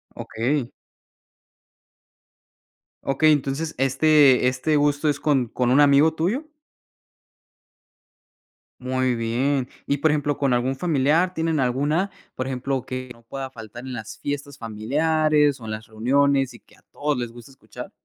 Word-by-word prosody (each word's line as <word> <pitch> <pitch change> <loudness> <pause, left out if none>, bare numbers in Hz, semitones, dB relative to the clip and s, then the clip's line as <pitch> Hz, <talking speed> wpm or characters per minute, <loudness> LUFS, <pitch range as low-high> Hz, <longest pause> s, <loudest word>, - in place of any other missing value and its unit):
Okey. 125 +2 -2 2.3
Okey, 145 +3 +3
entonces, 145 +2 -1
¿este 135 0 +4
este 130 +5 0
gusto 145 +1 +1
es 145 -1 -1
con 135 -5 +1
con 125 +2 -1
un 135 - +5
amigo 145 +2 +5
tuyo? 200 - -1 2.3
Muy 130 0 0
bien. 125 +4 0 0.2
Y, 140 - +1
por 155 +2 +2
ejemplo, 145 -1 0
¿con 140 -3 +1
algún 125 +2 0
familiar, 160 +4 +1
tienen 160 -2 -1
alguna, 145 +9 0 0.2
por 130 - -3
ejemplo, 130 0 -3
que 130 0 -6
no 115 -1 -14
pueda 135 +3 -6
faltar 115 -1 -10
en 130 - -6
las 110 -3 -8
fiestas 145 -1 -5
familiares, 150 +6 +1
o, 115 - -10
en 110 - -5
las 110 0 -6
reuniones, 135 +4 +1
y 120 - -13
que - - -24
a - - -27
todos 150 -1 -1
les 120 -2 -4
gusta 120 +1 -13
escuchar? 135 - -11
135 Hz, 145 wpm, -23 LUFS, 125-150 Hz, 2.3 s, un